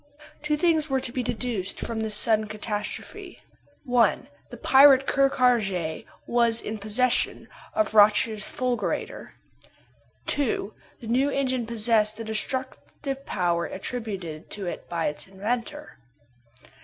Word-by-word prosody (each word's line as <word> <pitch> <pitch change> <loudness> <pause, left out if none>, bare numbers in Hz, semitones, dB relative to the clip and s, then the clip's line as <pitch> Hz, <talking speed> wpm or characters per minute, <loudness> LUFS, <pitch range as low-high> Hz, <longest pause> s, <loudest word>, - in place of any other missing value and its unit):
Two 300 0 0
things 320 -2 +1
were 265 0 +1
to 250 - 0
be 255 - -2
deduced 235 -5 -3
from 230 -1 -4
this 220 -1 +1
sudden 215 0 +3
catastrophe: 210 0 -6 0.4
1. 245 -6 +1 0.2
The 240 - -10
pirate 270 +2 +6
Ker 275 0 +3
Karraje 200 -12 0 0.2
was 235 -1 +3
in 215 -1 -5
possession 230 +4 0 0.3
of 320 -8 0
Roch's 210 0 +4
fulgurator. 250 -1 -3 0.9
2. 240 -7 -1 0.3
The 230 - -8
new 260 +5 +2
engine 260 -4 -1
possessed 220 -2 +3
the 225 - -5
destructive 260 +4 -4
power 175 -2 0
attributed 190 -7 -6
to 200 -2 -6
it 175 - -6
by 170 -2 -2
its 150 - -2
inventor. 235 +9 -5
230 Hz, 125 wpm, -25 LUFS, 210-255 Hz, 0.9 s, pirate